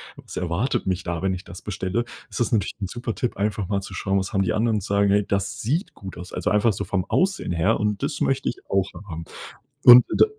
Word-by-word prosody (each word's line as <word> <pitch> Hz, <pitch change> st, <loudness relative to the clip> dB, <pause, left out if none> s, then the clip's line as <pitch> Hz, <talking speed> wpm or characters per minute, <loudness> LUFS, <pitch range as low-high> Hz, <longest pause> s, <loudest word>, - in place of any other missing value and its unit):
was -, -, -10 dB
erwartet 90 Hz, +7 st, -1 dB
mich 95 Hz, 0 st, -1 dB
da, 85 Hz, -1 st, -3 dB
wenn 95 Hz, -1 st, +1 dB
ich 90 Hz, -, -6 dB
das 90 Hz, -, -10 dB
bestelle?“ 95 Hz, +3 st, -2 dB, 0.3 s
Ist -, -, -6 dB
das 120 Hz, -, +1 dB
natürlich 110 Hz, -3 st, +1 dB
'n 95 Hz, -, -1 dB
super 120 Hz, +1 st, -4 dB
Tipp, 125 Hz, -, -2 dB
einfach 105 Hz, -2 st, -1 dB
mal 100 Hz, -1 st, 0 dB
zu 100 Hz, -, -9 dB
schauen, 95 Hz, +1 st, 0 dB
was 95 Hz, -, -4 dB
haben 95 Hz, -, +2 dB
die 95 Hz, -, +1 dB
anderen 110 Hz, -1 st, +1 dB
sagen: 100 Hz, +1 st, +2 dB
„Hey 105 Hz, 0 st, +3 dB
das 100 Hz, -1 st, -1 dB
sieht 155 Hz, -, -1 dB
gut 95 Hz, -2 st, -9 dB
aus.“ 90 Hz, +1 st, -9 dB
Also, -, -, -1 dB
einfach 105 Hz, +1 st, +3 dB
so -, -, -3 dB
vom 95 Hz, -3 st, -1 dB
Aussehen 190 Hz, -, +1 dB
her 85 Hz, +6 st, +2 dB
und 105 Hz, +1 st, -1 dB
das 145 Hz, 0 st, -2 dB
möchte 135 Hz, 0 st, +1 dB
ich -, -, -5 dB
auch 95 Hz, 0 st, +1 dB, 0.2 s
haben. 80 Hz, -1 st, -6 dB, 0.6 s
Und 125 Hz, -1 st, +10 dB
d -, -, +5 dB
100 Hz, 245 wpm, -24 LUFS, 95-115 Hz, 0.6 s, Und